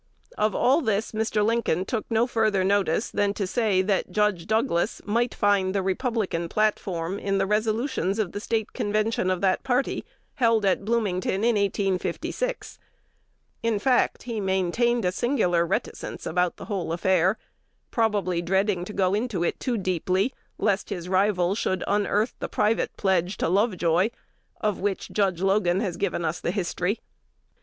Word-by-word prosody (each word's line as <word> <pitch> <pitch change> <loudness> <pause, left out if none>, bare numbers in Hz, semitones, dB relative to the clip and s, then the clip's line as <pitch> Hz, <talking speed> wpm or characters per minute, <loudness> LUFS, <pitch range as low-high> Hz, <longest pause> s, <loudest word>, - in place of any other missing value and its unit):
Of 215 - +1
all 270 +6 +3
this 220 -4 0
Mr. 215 -1 0
Lincoln 225 -6 +1
took 220 +1 -3
no 225 0 +3
further 220 -5 +1
notice 200 0 +1
than 205 0 0
to 200 - -1
say 195 -2 +1
that 195 0 0
Judge 210 -3 +1
Douglas 220 -5 +1
might 235 +3 0
find 200 -2 +2
the 195 - +1
Republican 190 -5 -1
platform 195 -4 -1
in 195 0 0
the 195 - +2
resolutions 215 - 0
of 210 -6 -1
the 205 - -4
State 220 0 -2
Convention 215 -3 0
of 185 -1 0
that 190 -1 +2
party, 260 0 0 0.3
held 230 -5 +2
at 195 0 +2
Bloomington 200 -3 0
in 235 0 +4
1856. 200 - -2 0.8
In 230 -2 +1
fact, 250 +4 +1
he 230 -3 -3
maintained 195 +5 +1
a 180 - +2
singular 180 -7 +1
reticence - - -3
about 180 +1 0
the - - -8
whole 190 -6 -3
affair, 185 +3 +2 0.5
probably 205 -6 +1
dreading 190 +1 +1
to 210 - -8
go 190 -2 +1
into 210 -4 -1
it - - -1
too 250 -3 -1
deeply, 185 +4 0 0.2
lest 200 -1 0
his 180 -1 -5
rival 190 -1 +2
should 190 -3 -1
unearth 205 +2 +1
the - - -4
private 215 +2 0
pledge 190 -1 +1
to - - 0
Lovejoy, 185 -1 +2 0.5
of 210 -3 -1
which 200 -1 -2
Judge 190 -3 0
Logan 190 -2 +2
has 190 -5 -2
given 180 -3 -1
us 160 +2 -2
the - - -2
history. 185 +2 -1
200 Hz, 160 wpm, -25 LUFS, 185-220 Hz, 0.8 s, in